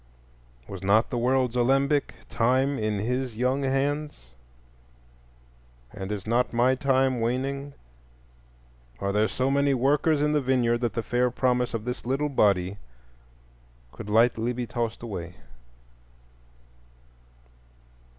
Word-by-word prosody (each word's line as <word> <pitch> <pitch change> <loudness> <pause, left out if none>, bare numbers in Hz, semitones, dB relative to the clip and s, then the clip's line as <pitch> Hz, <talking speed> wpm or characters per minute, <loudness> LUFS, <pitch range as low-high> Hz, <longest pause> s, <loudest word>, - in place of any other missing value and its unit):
Was 95 -2 -8
not 105 +4 +2
the 125 - -1
world's 125 0 +1
alembic, 135 +4 +1
Time, 130 +4 +1
in 105 -1 -1
his 125 +2 -2
young 130 +3 0
hands, 140 - -2 1.6
and 95 +1 -6
is 100 -2 -4
not 120 +3 0
my 120 +2 +3
time 130 -2 +1
waning? 135 +4 -2 1.2
Are 100 - -1
there 105 +2 +2
so 130 +4 -1
many 140 0 +2
workers 145 +4 +2
in 150 +1 +1
the 150 - +2
vineyard 125 -3 +1
that 120 -3 -1
the 115 - -2
fair 125 +1 +1
promise 125 -1 0
of 110 -1 -5
this 125 0 -4
little 135 +4 -1
body 100 -6 +1 1.1
could 105 - -9
lightly 115 +2 +2
be 125 0 -3
tossed 115 -1 -4
away? 90 -6 -6
125 Hz, 120 wpm, -26 LUFS, 115-135 Hz, 1.6 s, my